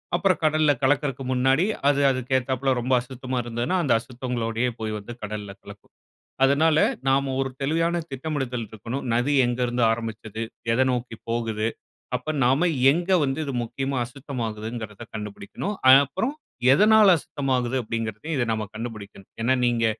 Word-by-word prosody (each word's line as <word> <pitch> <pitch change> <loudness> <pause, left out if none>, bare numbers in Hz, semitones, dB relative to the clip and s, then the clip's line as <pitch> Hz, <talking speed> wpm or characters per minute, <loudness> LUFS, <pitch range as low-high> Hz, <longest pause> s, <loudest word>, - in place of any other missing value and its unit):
அப்புறம் 185 -5 +2
கடல்ல 155 -1 +4
கலக்கிறதுக்கு 135 -1 +1
முன்னாடி 130 +6 +3 0.2
அது 145 0 +3
அதுக்கு 130 0 -5
ஏத்தாப்ல 130 +1 -1
ரொம்ப 130 +2 0
அசுத்தமா 130 0 -5
இருந்ததுன்னா, 120 +10 -1
அந்த 140 - +3
அசுத்தங்களோடையே 120 -1 -2
போய் 110 -1 -3
வந்து 120 +4 -9
கடல்ல 105 -1 -5
கலக்கும். - - -14 0.5
அதனால 150 +3 +4 0.3
நாம 135 0 +2
ஒரு 135 0 0
தெளிவான 165 +4 +1
திட்டமிடுதல் 135 -4 -3
இருக்கணும். 115 +5 -5
நதி 120 +5 +1
எங்கேருந்து 120 0 0
ஆரம்பிச்சது? 110 -1 -5 0.3
எத 120 - +2
நோக்கி 120 -2 -3
போகுது? 115 -2 -1 0.5
அப்போ 125 +5 -3
நாம 135 +8 +3 0.2
எங்கே 175 +4 +1
வந்து 135 +3 -2
இது 140 - -3
முக்கியமா 135 +3 -3
அசுத்தமாகுதுங்கிறத 115 -4 -6
கண்டுபிடிக்கணும். 105 - -5
அ - - +11
அப்புறம் 190 - -2 0.4
எதனால 210 +3 +6
அசுத்தமாகுது 130 -4 -1
அப்பிடிங்கிறதையும் 115 +6 -4
இத 120 - +1
நாம 110 -1 -2
கண்டுபிடிக்கணும். 105 -4 -8
ஏன்னா 130 +3 +3
நீங்க 120 -1 +2
125 Hz, 140 wpm, -24 LUFS, 115-140 Hz, 0.5 s, அ